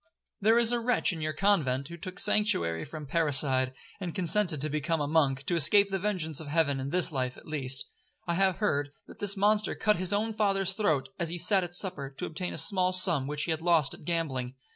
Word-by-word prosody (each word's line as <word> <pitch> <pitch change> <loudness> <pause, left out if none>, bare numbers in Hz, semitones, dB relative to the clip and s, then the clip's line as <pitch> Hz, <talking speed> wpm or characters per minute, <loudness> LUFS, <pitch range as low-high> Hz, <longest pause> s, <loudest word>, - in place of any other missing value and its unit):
There 220 +3 +3
is 235 -1 +3
a 240 - 0
wretch 235 -4 +1
in 160 - -7
your 155 0 -2
convent, 150 -8 +1
who 170 - -8
took 185 +2 -8
sanctuary 85 - +2
from 155 -2 -8
parricide, 135 -4 +1 0.3
and 180 -4 -6
consented 180 -3 +1
to 155 - +2
become 155 +2 -2
a 145 - -1
monk, 145 -3 +1
to - - -1
escape 195 +5 +4
the 195 - -1
vengeance 180 -7 -2
of 160 - -8
heaven 145 -2 +1
in 135 +1 -4
this 180 +2 +2
life 130 -3 -3
at - - -15
least. 135 -4 -2 0.4
I 170 - -1
have 190 +1 +2
heard, 145 -9 -1 0.2
that - - -15
this 205 0 +2
monster 210 +1 +2
cut 210 -1 +1
his 185 +1 0
own 215 +2 -1
father's 195 -3 0
throat, 160 -10 0
as 170 -2 -1
he 175 - -4
sat 185 +2 +3
at 175 0 -5
supper, 175 -8 -1
to - - -4
obtain 180 +3 -4
a - - -6
small 185 -2 +2
sum 170 -7 +2
which 150 0 -2
he 170 - -2
had 160 0 -2
lost 165 -4 +2
at - - -13
gambling. 135 -7 -3
170 Hz, 230 wpm, -28 LUFS, 145-195 Hz, 0.4 s, escape